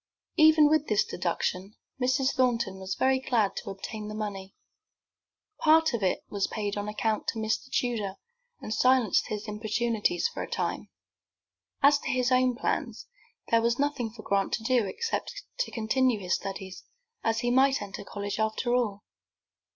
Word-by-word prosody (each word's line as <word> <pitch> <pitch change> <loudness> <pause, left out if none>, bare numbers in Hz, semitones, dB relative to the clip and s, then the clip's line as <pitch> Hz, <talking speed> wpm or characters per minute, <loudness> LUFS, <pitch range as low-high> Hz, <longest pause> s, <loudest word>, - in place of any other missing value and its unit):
Even 310 -1 +7
with 310 0 +2
this 210 -1 +3
deduction 185 +3 -2 0.3
Mrs. 260 +1 +2
Thornton 235 -7 +1
was 190 0 -4
very 260 0 +2
glad 230 -6 +1
to - - -5
obtain 210 +2 -6
the 210 - -6
money. 195 -3 -5 1.0
Part 315 -1 +4
of 235 - -1
it 185 -2 0
was 200 -1 -1
paid 205 -2 -3
on 205 0 -3
account 215 0 -1
to - - -1
Mr. 220 +4 -1
Tudor, 220 -8 -1 0.4
and 215 - -4
silenced 250 -3 +3
his 215 +1 -5
importunities 215 -3 0
for - - -6
a - - -5
time. - - -3 0.9
As 285 +1 +6
to - - -5
his 255 0 +1
own 255 -1 +3
plans, - - -2 0.5
there 230 0 +5
was 235 +1 +1
nothing 285 -5 -1
for 215 0 -12
Grant 195 -1 0
to 220 - -1
do 240 -3 +2
except 460 - -3 0.2
to - - 0
continue 235 +1 +1
his 185 -2 -2
studies, 190 -1 -5 0.4
as 225 0 +1
he 240 -1 0
might 265 +2 +4
enter 200 -1 -7
college 205 +1 -5
after 220 +3 0
all. 215 -5 0
225 Hz, 165 wpm, -28 LUFS, 205-255 Hz, 1.0 s, Even